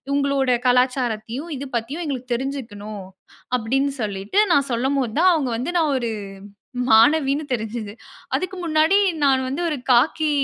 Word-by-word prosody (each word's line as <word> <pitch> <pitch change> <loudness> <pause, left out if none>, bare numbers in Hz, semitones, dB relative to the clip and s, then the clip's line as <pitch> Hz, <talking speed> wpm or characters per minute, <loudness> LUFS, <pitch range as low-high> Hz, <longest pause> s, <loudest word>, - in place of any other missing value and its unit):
உங்களோட 280 -2 +1 0.2
கலாச்சாரத்தையும், 250 +2 0
இது 280 +1 -6
பத்தியும் 280 +10 -5
எங்களுக்கு 255 -3 -3
தெரிஞ்சுக்கணும், 220 -6 -6 0.5
அப்பிடின்னு 270 +5 0
சொல்லிட்டு, 200 - -4 0.2
நான் 280 -1 +2
சொல்லும்போது 260 -1 -1
தான், 370 0 +6
அவுங்க 275 -7 -1
வந்து 260 +9 -3
நான் 305 -3 +1
ஒரு 235 -2 -2 0.8
மாணவின்னு 285 +5 +4
தெரிஞ்சது 220 -3 -3 0.4
அதுக்கு 370 +1 -2
முன்னாடி 320 +3 +3 0.3
நான் 265 -1 +3
வந்து 275 +6 -3
ஒரு 300 - -1
காக்கி, 300 +5 +3
265 Hz, 130 wpm, -22 LUFS, 230-285 Hz, 0.8 s, தான்